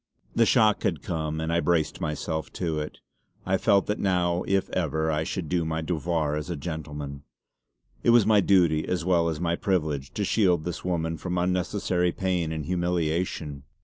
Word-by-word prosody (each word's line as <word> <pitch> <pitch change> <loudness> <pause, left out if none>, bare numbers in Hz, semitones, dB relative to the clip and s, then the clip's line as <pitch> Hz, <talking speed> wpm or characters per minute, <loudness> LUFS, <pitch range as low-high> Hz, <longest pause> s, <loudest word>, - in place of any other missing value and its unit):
The 115 -1 +3
shock 110 -5 +4
had 80 -9 -1
come, 80 -2 -2
and 80 +1 -1
I 85 - +3
braced 85 -3 0
myself 80 +1 -3
to 80 -4 -2
it. 75 - -5 0.5
I 95 +1 +2
felt 100 -3 +3
that 105 - -2
now 90 -2 +1
if 95 0 +1
ever 80 -2 0
I 75 0 0
should 85 0 -4
do 85 +1 0
my 80 0 -2
devoir 80 -2 -1
as 75 +2 -4
a 85 - -2
gentleman. 75 -2 -6 0.8
It - - +2
was 120 -3 +6
my 105 -1 +5
duty 85 -6 +3
as 90 -2 -1
well 85 -2 +3
as 80 -2 -3
my 85 0 0
privilege 75 -8 -1
to 105 - 0
shield 90 -6 +2
this 90 0 -4
woman 80 -2 -1
from 90 +3 -3
unnecessary 90 0 0
pain 90 -3 -1
and 80 -2 -4
humiliation. 85 -4 -1
85 Hz, 180 wpm, -26 LUFS, 80-90 Hz, 0.8 s, was